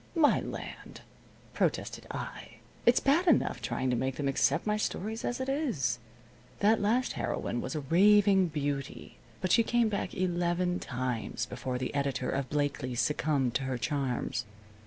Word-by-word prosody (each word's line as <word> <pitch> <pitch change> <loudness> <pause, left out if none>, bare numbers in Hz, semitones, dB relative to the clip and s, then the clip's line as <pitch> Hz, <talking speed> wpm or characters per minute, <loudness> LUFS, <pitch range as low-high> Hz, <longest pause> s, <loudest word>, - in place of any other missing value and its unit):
"My 320 -3 +5
land!" - - -8 0.5
protested - - -1
I. - - -6 0.3
"It's 240 - +6
bad 320 +7 +2
enough 295 - +3
trying 125 +2 -1
to - - +2
make 130 +2 -1
them 145 - -2
accept 135 +4 +2
my 210 0 +1
stories 215 +1 -3
as 245 - -2
it 260 - -2
is. 220 - 0 0.6
That 215 +2 +4
last 235 +5 +2
heroine - - -2
was - - -4
a 155 - -1
raving 195 +5 +5
beauty, 145 -3 -4 0.2
but 185 -1 0
she 230 - +6
came 235 0 +2
back 200 -2 -3
eleven 175 0 0
times 125 -2 -3
before 125 0 -4
the 125 0 -3
editor 140 -2 -1
of 135 -1 -2
Blakely's 140 -4 -1
succumbed 135 0 +1
to 135 - -1
her 130 -1 -2
charms." 125 -1 -2
150 Hz, 155 wpm, -30 LUFS, 130-210 Hz, 0.6 s, It's